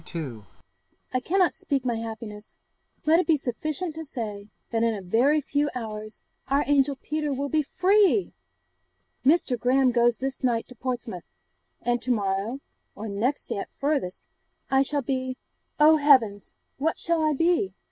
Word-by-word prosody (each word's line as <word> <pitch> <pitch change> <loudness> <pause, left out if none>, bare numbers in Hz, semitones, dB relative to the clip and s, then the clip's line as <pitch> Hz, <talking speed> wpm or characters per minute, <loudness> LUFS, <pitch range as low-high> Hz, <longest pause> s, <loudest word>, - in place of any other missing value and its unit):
I 255 - +2
cannot 365 +1 +2
speak 275 -3 -2
my 240 -2 0
happiness; 220 -2 -7 0.5
let 320 +2 +5
it 365 - 0
be 320 -2 +4
sufficient 310 +6 -3
to 320 +1 -6
say, 215 -7 -6 0.2
that 225 -1 0
in 230 -1 +2
a 200 - -6
very 255 +11 +3
few 290 +1 0
hours 215 -2 -6 0.2
our 280 +2 +2
angel 280 -1 +3
Peter 300 +2 -3
will 280 +1 -2
be 310 +1 +2
FREE! 385 +5 +3 0.9
Mr. 265 -4 +3
Graham 255 +2 +3
goes 240 -1 +3
this 270 +1 -4
night 235 -3 +1
to 250 - -12
Portsmouth, 240 -7 -4 0.6
and 240 0 +1
to 250 - -5
morrow, 210 +3 0 0.3
or 220 - -6
next 230 +8 -1
day - - -3
at - - -5
farthest, 275 -11 -2 0.4
I 270 0 +5
shall 285 +1 0
be 260 0 -2 0.4
oh, 310 +1 +7
heavens! 255 -9 +3 0.2
what 320 +3 0
shall 335 -1 +1
I 310 -1 +3
be? 345 +6 +1
265 Hz, 155 wpm, -26 LUFS, 230-300 Hz, 0.9 s, oh